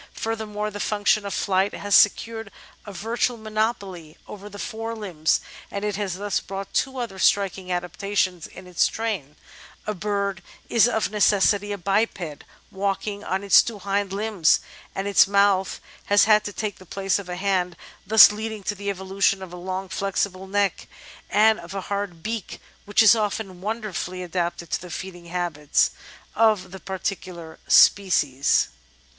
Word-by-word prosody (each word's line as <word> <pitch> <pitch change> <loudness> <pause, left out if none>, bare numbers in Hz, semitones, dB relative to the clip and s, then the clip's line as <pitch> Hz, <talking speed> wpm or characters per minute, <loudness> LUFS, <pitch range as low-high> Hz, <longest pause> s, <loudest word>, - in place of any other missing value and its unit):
Furthermore, 215 -1 -3
the 205 - -7
func 205 -1 -2
tion 205 -1 +3
of 200 - -4
flight 195 +1 +1
has 205 -1 +1
secured 225 +1 +3 0.4
a - - -6
virtual 230 +5 -1
monopoly 215 -7 -3
over 205 0 -9
the 205 - -10
fore 225 +2 -5
limbs, 180 -8 0 0.3
and 200 +1 -4
it 210 -1 -1
has 195 -3 -2
thus 200 +1 -1
brought 195 0 -7
two 265 0 0
other 230 -6 -5
striking 190 -1 +1
adaptations 180 0 -1
in 185 - -13
its 180 -2 +2
train 200 -11 -4 0.3
— - - -22
a 215 - -2
bird 200 -1 -2 0.3
is 230 0 +5
of 220 -5 0
necessity 205 0 +3
a 205 - -2
biped, 195 -5 -1 0.3
walking 200 +1 -2
on 190 +1 -2
its 200 - +7
two 230 -2 -5
hind 200 0 -1
limbs, 200 -4 +2 0.4
and 195 +1 -2
its 200 -1 +5
mouth 200 -1 +2 0.3
has 205 0 +5
had 215 0 +5
to 205 - -3
take 210 0 -4
the 185 - -14
place 195 +2 0
of 190 -3 -9
a 180 - -3
hand, 180 -2 0 0.3
thus 220 -1 +9
leading 220 0 -5
to 205 - -1
the 200 0 -5
evolution 190 0 0
of 180 -2 -10
a - - -6
long 185 +2 -4
flexible 190 +1 -2
neck, 200 0 0 0.4
and 220 +1 +4
of 170 +3 -9
a 195 - -2
hard 200 -5 -3
beak 220 -2 -4 0.3
which 205 +2 +4
is 215 - +8
often 205 -4 -3
wonderfully 200 -4 -4
adapted 175 -1 -3
to - - -1
the 180 - -9
feeding 175 0 -7
habits 170 -4 0 0.4
of 215 -5 +2
the 190 - -8
particular 185 -3 -5
species. 145 -9 +4
200 Hz, 165 wpm, -24 LUFS, 185-210 Hz, 0.4 s, thus